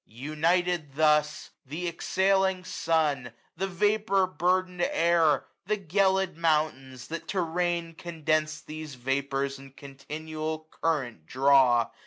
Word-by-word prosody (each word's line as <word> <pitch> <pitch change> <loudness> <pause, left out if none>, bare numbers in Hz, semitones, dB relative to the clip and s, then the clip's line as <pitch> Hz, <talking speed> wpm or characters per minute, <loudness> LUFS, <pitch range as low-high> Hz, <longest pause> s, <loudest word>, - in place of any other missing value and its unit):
United, 155 +4 -1
thus, 150 -1 +2 0.2
Th' 165 +5 -4
exhaling 190 +2 +1
sun, 150 -9 0 0.2
the 190 +3 -2
vapour 200 +1 +2
burden'd 180 0 0
air, 165 -4 +3 0.2
The 215 - +1
gelid 190 -1 +1
mountains, 150 -6 0
that 165 +1 -6
to 190 - 0
rain 170 0 -1
condens'd 155 -2 -2
These 155 -2 -7
vapours 135 +2 -2
in 135 -1 -13
continual 155 +3 -6
current 130 - -2
draw. 130 -2 +4
155 Hz, 110 wpm, -28 LUFS, 140-180 Hz, 0.2 s, draw